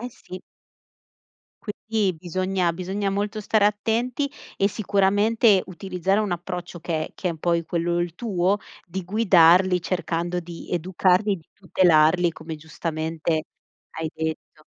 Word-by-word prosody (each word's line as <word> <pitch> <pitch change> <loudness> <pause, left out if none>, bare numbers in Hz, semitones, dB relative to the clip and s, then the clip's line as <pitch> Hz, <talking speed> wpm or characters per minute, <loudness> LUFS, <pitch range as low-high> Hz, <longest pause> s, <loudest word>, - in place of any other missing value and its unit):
Eh 245 - -5
sì. 185 -4 -11 1.2
Quindi 210 -3 -1
bisogna 185 0 -1
bisogna 195 +3 -2
molto 205 +2 -2
stare 210 0 +2
attenti, 230 +6 0 0.3
e 195 - +3
sicuramente 205 +1 +3
utilizzare 190 +2 -1
un 210 -4 -1
approccio 175 0 -5
che 160 -2 -2
è - - -14
che 185 - -3
è - - 0
un 160 - -8
po' 170 +2 +1
quello 170 +1 -1
il 175 -1 -2
tuo 195 -3 0 0.3
di 185 +1 -5
guidarli 185 -2 +5
cercando 175 0 -2
di 170 -1 -10
educarli 185 +3 +2
e - - -1
di 165 - -16
tutelarli, 175 -2 +3
come 160 0 -8
giustamente 160 0 -3 0.5
hai 160 -1 -4
detto. 160 -1 -5
180 Hz, 140 wpm, -24 LUFS, 170-200 Hz, 1.2 s, guidarli